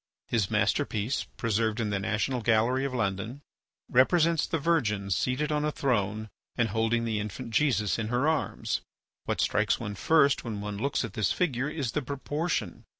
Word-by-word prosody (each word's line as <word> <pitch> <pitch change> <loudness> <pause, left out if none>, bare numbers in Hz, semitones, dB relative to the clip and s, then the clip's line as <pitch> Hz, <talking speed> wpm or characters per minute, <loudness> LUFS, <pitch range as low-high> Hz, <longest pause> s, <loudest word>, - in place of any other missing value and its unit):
His 110 -6 0
masterpiece, 110 +6 0
preserved 110 0 0
in 110 -2 -1
the 100 - 0
National 110 +5 -1
Gallery 120 +4 +2
of 140 - -3
London, 110 +5 -2 0.4
represents 160 +5 +3
the 165 - 0
Virgin 120 -12 0
seated 130 - 0
on 150 0 +1
a 150 - +1
throne 110 -6 0 0.3
and 120 -2 +1
holding 115 +2 +1
the 110 -2 -1
infant 105 +3 -5
Jesus 110 -6 +2
in 110 - -2
her 125 +5 +1
arms. 160 0 -1 0.4
What - - -2
strikes - - +2
one 105 - -4
first 140 +6 +3
when 110 -4 -4
one 100 0 -5
looks 135 +1 0
at 110 - -8
this 105 -2 +1
figure 140 -6 0
is 145 -7 -3
the 150 - -1
proportion. 140 - -3
120 Hz, 170 wpm, -28 LUFS, 105-140 Hz, 0.4 s, represents